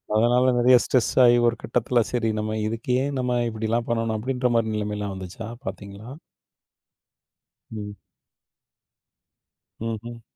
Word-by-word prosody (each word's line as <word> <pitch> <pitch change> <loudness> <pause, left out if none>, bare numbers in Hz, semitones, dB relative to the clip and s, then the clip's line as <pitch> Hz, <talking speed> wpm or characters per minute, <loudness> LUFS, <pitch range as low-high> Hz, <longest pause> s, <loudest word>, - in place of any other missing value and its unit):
அதனால, 125 +3 +4
நெறைய 125 +1 +6
ஸ்ட்ரெஸ் 125 -3 +1
ஆயி, 120 0 +7
ஒரு 115 - +1
கட்டத்தில 120 +1 +1
சரி 120 -2 0
நம்ம 110 0 -2
இதுக்கு 115 +2 -4
ஏன் 140 0 -2
நம்ம 125 -1 0
இப்படிலாம் 110 +1 -2
பண்ணணும், 115 -1 0
அப்படின்ற 125 +2 -1
மாரி 110 -1 +1
நிலைமைலாம் 105 -1 -3
வந்துச்சா? 95 +4 -7 0.2
பார்த்தீங்களா? 100 +3 -8 1.6
ம். 105 -2 -6 1.9
ம்ஹ்ம். 115 +1 -5
115 Hz, 115 wpm, -24 LUFS, 110-120 Hz, 1.9 s, ஆயி